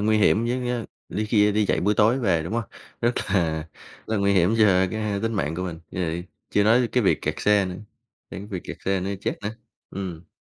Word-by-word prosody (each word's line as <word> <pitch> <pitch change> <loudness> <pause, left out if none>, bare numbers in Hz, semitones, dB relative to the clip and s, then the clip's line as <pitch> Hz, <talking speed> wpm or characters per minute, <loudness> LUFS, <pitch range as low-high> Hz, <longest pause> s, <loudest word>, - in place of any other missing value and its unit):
nguy 110 +1 +3
hiểm, 105 +2 +4
với, 125 0 -1
ờ, 120 -2 -2 0.2
li 110 - -2
khi, 105 -1 +4
a, - - +3
đi 105 0 +2
dạy - - +1
buổi 105 +3 +2
tối 110 +5 +4
về, 95 -9 +1
đúng 85 - -5
hông? 115 -1 0 0.4
Rất 120 +1 +2 0.2
là 80 -5 +1 0.4
là 110 - -1
nguy 100 0 +2
hiểm 95 +3 +3
cho 110 - +6 0.3
cái, 110 - -3
a, 105 -2 -1
tính 115 0 0
mạng 80 -5 -1
của 90 - -3
mình, 85 -3 -4
giời, 85 -1 -2 0.3
chưa 105 - +3
nói 115 +3 +5
tới 120 -2 +1
cái 125 - +1
việc 95 - +2
kẹt - - -1
xe 105 -1 +3
nữa, 90 -1 -4 0.6
đến 95 - -6
cái 100 - -8
việc 95 -4 -5
kẹt - - -6
xe 95 -1 +1
nữa 95 - -3
thì 100 - -3
chết - - -2
nữa, 105 - -2 0.4
ừm. 90 -3 -6
100 Hz, 260 wpm, -24 LUFS, 90-110 Hz, 0.6 s, cho